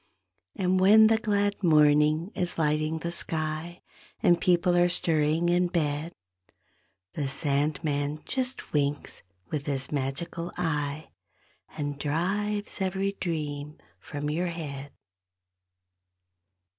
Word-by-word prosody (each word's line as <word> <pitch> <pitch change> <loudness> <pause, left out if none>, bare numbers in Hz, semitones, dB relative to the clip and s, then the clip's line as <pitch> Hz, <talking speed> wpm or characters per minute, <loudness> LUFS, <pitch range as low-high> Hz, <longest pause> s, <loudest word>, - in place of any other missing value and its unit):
And 185 -1 +1
when 210 +4 +7
the 220 0 +4
glad 205 -2 0
morning 150 +2 +4
is 180 -1 -1
lighting 155 0 +1
the 170 +1 -4
sky 160 +1 -3 0.4
And 175 -1 +4
people 180 0 +3
are 175 0 +4
stirring 160 -1 +1
in 175 +1 +3
bed, 155 -2 -1 1.0
The 145 -3 -2
Sandman 145 +1 -1
just 260 -1 -2
winks 145 -1 -1 0.3
with 145 -1 -3
his 135 -2 -1
magical 150 +5 -3
eye 150 -3 -2 0.7
And 145 -2 -3
drives 200 +8 -1
every 190 +1 0
dream 150 -3 -4 0.2
from 150 0 -4
your 175 +4 -1
head. 145 -5 -6
160 Hz, 105 wpm, -27 LUFS, 145-180 Hz, 1.0 s, when